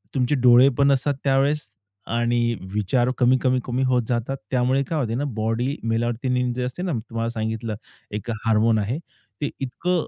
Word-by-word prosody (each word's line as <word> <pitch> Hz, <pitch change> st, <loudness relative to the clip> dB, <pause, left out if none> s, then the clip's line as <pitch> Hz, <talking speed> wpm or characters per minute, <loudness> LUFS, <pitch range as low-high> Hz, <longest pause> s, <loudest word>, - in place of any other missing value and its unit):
तुमचे 130 Hz, +2 st, +2 dB
डोळे 125 Hz, 0 st, +6 dB
पण 140 Hz, 0 st, +4 dB
असतात 140 Hz, +1 st, +2 dB
त्यावेळेस 140 Hz, 0 st, +2 dB, 0.5 s
आणि 120 Hz, 0 st, +1 dB, 0.2 s
विचार 120 Hz, +5 st, +1 dB
कमी-कमी-कमी 130 Hz, 0 st, +2 dB
होत 125 Hz, -1 st, +2 dB
जातात 125 Hz, +3 st, -1 dB
त्यामुळे 130 Hz, +2 st, +2 dB
काय 155 Hz, +3 st, -2 dB
होते 115 Hz, -4 st, -1 dB
ना, 140 Hz, -, -1 dB
की 140 Hz, -, -3 dB
बॉडी 115 Hz, +5 st, -1 dB
मेलाटोनिन 120 Hz, +2 st, 0 dB
जे 125 Hz, -, -2 dB
असते 125 Hz, +8 st, -4 dB
ना 180 Hz, -5 st, -1 dB
मी 115 Hz, -, -1 dB
तुम्हाला 115 Hz, 0 st, -2 dB
सांगितलं 110 Hz, -1 st, -3 dB, 0.4 s
एक 105 Hz, +3 st, -5 dB, 0.2 s
हार्मोन 110 Hz, 0 st, +3 dB
आहे 110 Hz, +7 st, -1 dB, 0.4 s
ते 145 Hz, -, 0 dB
इतकं 165 Hz, +7 st, -1 dB
125 Hz, 165 wpm, -23 LUFS, 115-135 Hz, 0.5 s, डोळे